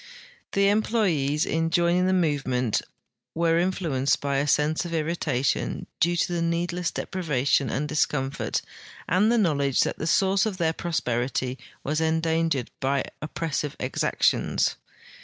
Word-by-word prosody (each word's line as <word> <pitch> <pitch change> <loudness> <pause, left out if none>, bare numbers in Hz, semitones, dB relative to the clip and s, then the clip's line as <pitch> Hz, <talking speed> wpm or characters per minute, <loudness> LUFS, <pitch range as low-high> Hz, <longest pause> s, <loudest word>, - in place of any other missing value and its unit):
The 200 -1 +3
employes 190 -10 +1
in 165 0 0
joining 175 +2 +2
the - - +2
movement 135 - +1 0.5
were 165 0 +2
influenced 170 -7 0
by 140 -1 -1
a 140 +2 0
sense 150 +3 +2
of 170 -1 -4
irritation 150 -5 -1
due 175 +1 +3
to 175 0 0
needless 170 +1 -1
deprivation 140 -8 0
and 150 +2 -1
discomfort 140 -3 -1 0.4
and 205 +5 +3
the 240 - +3
knowledge 140 - +2
that - - -1
the 160 - -2
source 195 +4 +3
of 200 -4 -4
their 165 -2 +1
prosperity 130 -5 -2 0.2
was 150 +3 -1
endangered 160 -4 0
by 135 +1 +1 0.2
oppressive 150 -1 -3
exactions. - - +1
160 Hz, 130 wpm, -25 LUFS, 140-175 Hz, 0.5 s, The